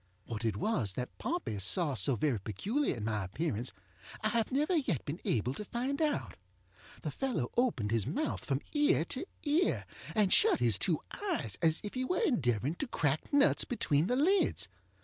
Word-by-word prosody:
What 115 -1 -5
it 110 -3 0
was 115 - 0
that 125 +5 -5
Pompey 330 - -2
saw 150 - +3
so 135 0 +2
very 120 0 0
peculiar 195 - -1
in 110 - -5
my 105 -2 -1
appearance 115 - -2 0.5
I 215 - +1
have 225 0 0
never 300 +7 +1
yet 260 - 0
been 150 +5 -5
able 125 +2 +1
to 210 - -5
find 255 +7 -2
out. 305 -2 -1 0.7
The - - -2
fellow 245 - -2
opened 210 - +1
his 115 -3 +1
mouth 305 +3 -2
from 135 0 -1
ear 295 - +3
to 265 - -3 0.2
ear, 310 +5 +1 0.3
and 210 -4 +3
shut - - +5
his 115 -5 +4
two 165 - +1 0.3
eyes 110 - -1
as 160 -1 +3
if 205 - -5
he 255 - -1
were 360 +8 0
endeavoring 140 - +1
to 285 - -3
crack 150 - -1
nuts 285 -1 +4
between 160 - +1
the 250 - +1
lids. 360 +9 +2
165 Hz, 185 wpm, -32 LUFS, -, 0.7 s, shut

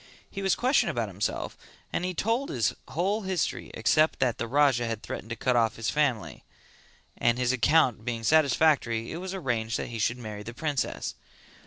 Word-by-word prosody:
He 195 - -5
was 190 -1 +2
questioned 255 +3 +2
about - - -2
himself - - -3 0.4
and - - -1
he 180 0 -2
told 230 +8 0
his 120 -3 0
whole 195 +6 0
history 190 -5 -2
except 155 0 +3
that 125 -3 0
the 115 - -2
Raja 130 -2 +3
had 115 -1 -4
threatened 110 - -6
to 115 - -3
cut 125 +2 0
off 115 -2 +2
his 115 -2 -2
family, 120 - -1 0.8
and 120 0 +3
his 125 -1 +1
account 130 -3 +3
being 115 -1 -3
satisfactory 140 -4 +3
it 160 - -4
was 190 +2 -5
arranged 115 -10 -1
that - - -4
he 115 -1 -5
should 115 +3 +1
marry 110 -4 -7
the 120 +3 -8
princess. 145 -3 -2
125 Hz, 185 wpm, -28 LUFS, 115-160 Hz, 0.8 s, except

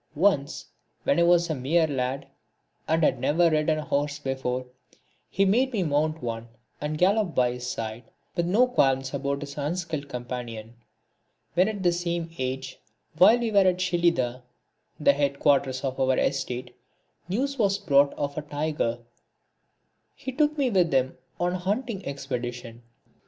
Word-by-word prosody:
Once, 150 -4 +1 0.4
when 140 - +2
I - - +4
was 170 0 +4
a 160 - -1
mere 155 +5 +2
lad, 135 -1 -2 0.6
and 160 +1 +2
had - - +3
never 165 +2 +3
ridden 155 0 +2
a 155 - -3
horse 145 +1 -1
before, 130 -3 -3 0.6
he 195 - +2
made 250 +7 +3
me 210 -6 0
mount 155 0 0
one 115 -1 -4 0.3
and 150 +1 -2
gallop 195 +1 +2
by 125 -1 +3
his 125 0 -5
side, 110 0 -5 0.3
with 170 -1 0
no 215 +8 +4
qualms 135 - +1
about 140 0 -2
his 145 0 -7
unskilled 155 -1 -3
companion. 120 -3 -6 0.8
When 180 +3 +4
at 205 -3 -3
the 175 - +4
same 170 -1 -2
age, 130 0 -4 0.4
while 220 +6 +8
we 235 -2 -1
were 200 - +5
at 185 -2 +3
Shelidah, 170 -9 +1 0.6
(the 145 -2 +5
head 140 -1 0
quarters 135 -3 +2
of 130 -1 -3
our 130 -1 +2
estate,) 125 -2 -2 0.5
news 270 +7 -1
was 200 -2 +3
brought 140 -7 +3
of 145 0 -3
a - - -4
tiger, 150 -5 -2 1.2
he 265 - -6
took 300 +3 +1
me 270 -4 +1
with 180 -5 +3
him 130 -1 +1 0.2
on 175 +1 +1
a 185 - -2
hunting 205 +2 -2
expedition. 120 -4 -5
150 Hz, 160 wpm, -26 LUFS, 130-180 Hz, 1.2 s, while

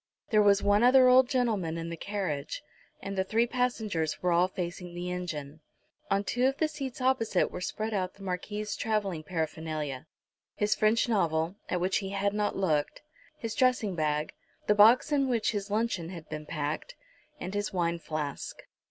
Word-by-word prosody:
There 215 -1 +5
was 200 -1 +4
one 205 +1 +4
other 255 +1 +7
old 255 0 +6
gentleman 210 -10 0
in 165 0 -4
the - - -3
carriage, 195 - -3 0.4
and 195 0 -4
the 190 - +1
three 225 +5 +2
passengers 220 -10 -1
were 180 - +1
all 175 +2 +4
facing 180 -1 -5
the 175 +1 -4
engine. 160 -5 -5 0.5
On 195 +1 +2
two 245 +6 +1
of 270 +1 -1
the 315 - +2
seats 275 -4 -6
opposite 255 -7 +2
were 180 - -6
spread 215 +4 -3
out 185 -3 -2
the 195 - -13
Marquis's 205 +3 -3
travelling 205 -7 -1
paraphernalia, 155 -3 -4 0.5
his 210 0 +2
French 215 +3 +2
novel, 165 -6 +1 0.2
at 180 - 0
which 185 +2 +1
he 195 - -5
had 200 +1 0
not 210 0 0
looked, 155 - 0 0.3
his 230 -5 -4
dressing 250 -5 +2
bag, 155 -2 -1 0.3
the 210 - +4
box 225 +8 +6
in 275 -2 +2
which 235 -3 +1
his 205 -2 -3
luncheon 210 -6 -1
had 170 -4 -9
been 150 0 -6
packed, 155 - -3 0.4
and 185 +2 -5
his 205 0 -1
wine 170 -3 0
flask. 155 -3 -5
195 Hz, 180 wpm, -29 LUFS, 170-225 Hz, 0.5 s, other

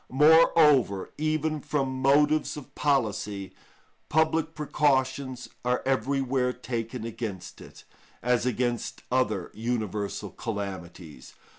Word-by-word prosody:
Moreover, 150 - +5
even 155 0 0
from 130 -3 -2
motives 150 +3 +3
of 145 - -10
policy, 105 -8 -1 0.6
public 160 0 +1
precautions 130 -3 0 0.2
are 125 0 0
everywhere 135 -1 0
taken 120 -2 -5
against 110 -5 -6
it, - - -13 0.4
as 125 0 +2
against 120 -1 -2
other 110 -8 0
universal 105 -3 -3
calamities. 95 - -7
130 Hz, 95 wpm, -27 LUFS, 110-145 Hz, 0.6 s, Moreover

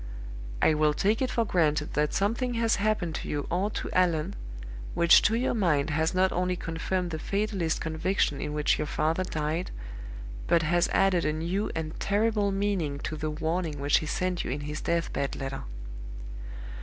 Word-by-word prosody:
I - - +6
will 150 -1 +3
take 210 - +2
it 260 - +1
for 230 -2 +1
granted 155 -6 +1
that 150 0 +1
something 235 +5 0
has 230 0 +2
happened 200 -5 0
to - - -7
you 145 -1 -2
or 185 +4 +1
to - - -4
Allan 180 0 +2 0.6
which 170 0 +7
to 220 - +3
your 245 +3 +1
mind 160 -9 +2
has 160 +3 +1
not 185 0 +4
only 180 +1 0
confirmed 175 +2 -2
the 160 - -3
fatalist 195 -4 -1
conviction 160 -2 0
in 150 - -3
which 150 0 +2
your 150 - -1
father 160 +5 +1
died, 160 0 -2 0.8
but 170 -1 +4
has 170 +2 +3
added 190 -3 +3
a 150 - +1
new 175 +6 -1
and 160 -1 -4
terrible 210 0 +2
meaning 195 -7 0
to 155 - -3
the 155 0 -2
warning 160 0 -2
which 140 +1 +3
he 155 - -5
sent 180 +3 -1
you - - -4
in 140 +3 -2
his 150 +1 -4
death 170 0 0
bed 140 -1 -1
letter. 135 - -4
170 Hz, 180 wpm, -28 LUFS, 155-195 Hz, 0.8 s, which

